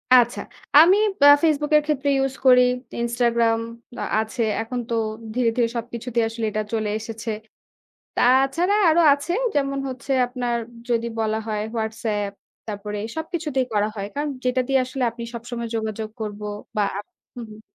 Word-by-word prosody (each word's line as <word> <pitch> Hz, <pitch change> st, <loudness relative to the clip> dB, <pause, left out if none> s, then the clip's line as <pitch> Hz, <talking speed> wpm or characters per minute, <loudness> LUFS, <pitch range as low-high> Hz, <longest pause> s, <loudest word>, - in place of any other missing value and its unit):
আচ্ছা, 240 Hz, -1 st, +4 dB, 0.4 s
আমি 360 Hz, +6 st, +7 dB, 0.2 s
বা 285 Hz, -, +8 dB, 0.2 s
Facebook 300 Hz, -1 st, +2 dB
এর 300 Hz, -, +3 dB
ক্ষেত্রে 285 Hz, -1 st, 0 dB
use 270 Hz, 0 st, -3 dB
করি। 250 Hz, -1 st, +8 dB, 0.4 s
Instagram 235 Hz, -1 st, +2 dB, 0.4 s
আ-আছে। 220 Hz, +3 st, -1 dB, 0.2 s
এখন 245 Hz, +2 st, -4 dB
তো 235 Hz, -, -1 dB, 0.4 s
ধীরে, 245 Hz, -2 st, +2 dB
ধীরে 235 Hz, -1 st, +3 dB
সবকিছুতেই 235 Hz, 0 st, -2 dB
আসলে 225 Hz, 0 st, -3 dB
এটা 215 Hz, +1 st, -1 dB
চলে 215 Hz, -1 st, 0 dB
এসেছে। 225 Hz, +1 st, -6 dB, 0.9 s
তা-ছাড়া 270 Hz, +10 st, +3 dB
আরও 325 Hz, +2 st, +4 dB
আছে 285 Hz, +5 st, -1 dB, 0.2 s
যেমন 275 Hz, -1 st, 0 dB
হচ্ছে 260 Hz, +1 st, -4 dB
আপনার 245 Hz, -1 st, -2 dB, 0.3 s
যদি 235 Hz, 0 st, +1 dB
বলা 220 Hz, 0 st, 0 dB
হয় 210 Hz, -1 st, -2 dB, 0.2 s
WhatsApp 220 Hz, -2 st, -2 dB, 0.4 s
তারপরে 210 Hz, -1 st, -5 dB, 0.2 s
সবকিছুতেই 315 Hz, -5 st, -2 dB
করা 210 Hz, 0 st, +2 dB
হয়। 200 Hz, 0 st, -3 dB
কারণ, 295 Hz, +1 st, -1 dB, 0.2 s
যেটা 250 Hz, 0 st, +2 dB
দিয়ে 270 Hz, -, +3 dB
আসলে 260 Hz, +1 st, -5 dB
আপনি 235 Hz, +1 st, -9 dB
সবসময় 235 Hz, 0 st, -5 dB
যোগাযোগ 220 Hz, -1 st, -3 dB
করব 210 Hz, -1 st, -5 dB, 0.4 s
বা 210 Hz, -, +3 dB, 0.5 s
হুম, 240 Hz, -2 st, -7 dB
হুম। 215 Hz, 0 st, -12 dB
235 Hz, 150 wpm, -23 LUFS, 220-270 Hz, 0.9 s, বা